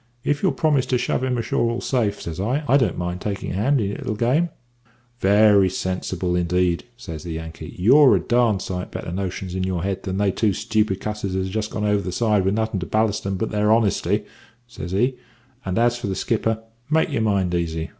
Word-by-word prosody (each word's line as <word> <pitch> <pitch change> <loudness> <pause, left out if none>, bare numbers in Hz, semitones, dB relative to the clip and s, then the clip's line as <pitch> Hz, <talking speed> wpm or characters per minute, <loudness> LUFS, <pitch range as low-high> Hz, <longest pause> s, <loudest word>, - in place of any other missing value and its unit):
If 145 0 0
you'll 190 - +2
promise 145 -5 +1
to 125 - +2
shove 125 +1 -1
him 130 -1 0
ashore 115 0 0
all 115 - -2
safe,' 110 -6 0
says 85 +1 -6
I, 125 +9 0
`I 140 -3 +2
don't 115 -8 0
mind 90 +1 -3
taking 100 -2 -3
a - - -3
hand 130 +9 +2
in 100 -3 0
your 100 - -4
little 110 - -3
game.' 130 +10 +2 0.7
"`Very 100 -1 +5
sensible 90 -1 -2
indeed,' 90 0 +1
says 80 -10 -7
the 85 0 -6
Yankee; 80 0 -8
`you've 130 +9 +6
a - - +2
darned 120 -5 +2
sight 90 -1 -4
better - - -6
notions 95 0 -4
in 95 0 -2
your 90 -2 -2
head 95 0 -2
than 95 0 -3
they 100 -1 +2
two 105 +1 +1
stupid 105 -1 0
cusses 105 -3 -3
as 95 0 0
has 95 - -6
just 110 -1 -1
gone 105 - -3
over 105 -1 +2
the 90 -1 -4
side 105 -1 +1
with 95 +2 +2
nothin' 110 -2 -1
to 85 - -5
ballast 110 -1 0
'em 95 -1 -1
but 110 +3 -2
their 105 0 +2
honesty,' 110 -3 +2 0.4
says 105 -8 -8
he; 125 +7 +1 0.5
`and 95 - -1
as 120 +1 +2
for 115 - -4
the 95 - -2
skipper 110 +1 -1 0.3
make 160 0 +2
your 120 - 0
mind 100 -5 +1
easy. 80 -2 -2
105 Hz, 225 wpm, -22 LUFS, 95-115 Hz, 0.7 s, `you've